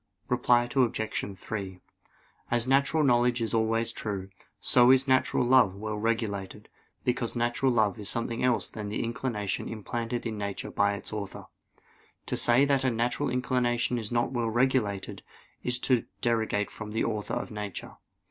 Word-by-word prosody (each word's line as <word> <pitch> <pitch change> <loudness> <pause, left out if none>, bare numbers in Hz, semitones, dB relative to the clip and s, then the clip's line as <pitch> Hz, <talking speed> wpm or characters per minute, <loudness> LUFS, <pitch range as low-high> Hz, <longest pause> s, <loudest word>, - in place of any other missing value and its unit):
Reply 120 0 +3
Obj. 110 -5 0
3: 95 -2 -5 0.7
As 120 +1 0
natural 140 +4 +3
knowledge 120 -2 +3
is 115 0 -1
always 115 0 +1
true, 100 -4 -5 0.3
so 120 0 +5
is 130 +1 +5
natural 130 -1 +2
love 120 -6 +5
well 105 +1 -4
regulated; 105 -3 -2 0.3
because 125 -1 -1
natural 120 +2 +1
love 110 -2 +1
is 105 -1 +1
nothing 115 0 -2
else 125 -2 +2
than 105 -2 -6
the 105 - -2
inclination 115 -5 -3
implanted 115 +2 -4
in 110 -2 -3
nature 100 -1 -4
by 100 0 +2
its 100 - -9
Author. 100 -2 -6 0.8
To - - -2
say 120 +4 +4
that 140 -2 +2
a 130 - +3
natural 120 +4 0
inclination 125 -1 0
is 110 0 -6
not 120 +1 +1
well 120 -3 -1
regulated, 115 -5 0 0.4
is 125 0 +1
to 125 -3 +2 0.2
derogate 110 -4 0
from 105 -1 -8
the 110 - 0
Author 105 -2 -2
of - - -4
nature. 105 -3 -6
115 Hz, 155 wpm, -28 LUFS, 105-125 Hz, 0.8 s, so